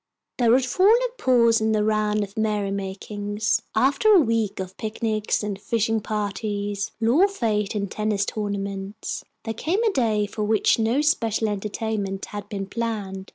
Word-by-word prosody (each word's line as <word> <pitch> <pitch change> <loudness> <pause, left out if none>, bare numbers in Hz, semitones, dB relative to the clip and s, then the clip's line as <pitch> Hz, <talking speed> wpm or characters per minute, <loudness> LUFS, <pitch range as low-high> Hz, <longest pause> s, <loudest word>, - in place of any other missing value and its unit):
There 235 -2 +4
had 255 0 +4
fallen 380 - +5
a - - -21
pause 235 -3 +4
in 220 0 +2
the 210 -1 +2
round 215 -1 +1
of 200 +1 -9
merry 210 -3 0
makings. 205 +2 -2
After 275 - +3
a 400 - +8
week 230 - 0
of 190 0 -5
picnics 215 -1 -1
and 205 -1 -4
fishing 225 0 0
parties, 205 -1 -3
lawn 250 - +4
fêtes 215 - -1
and 200 -2 -2
tennis 210 -2 0
tournaments, 200 0 -4 0.2
there 225 - -3
came 345 - -1
a 445 - +3
day 220 - +1
for 210 +1 -4
which 215 +1 +2
no 230 +6 +2
special 230 -7 +1
entertainment 205 -1 -3
had 205 0 -8
been 195 -1 -4
planned. 200 -3 -4
215 Hz, 160 wpm, -24 LUFS, 205-230 Hz, 0.2 s, a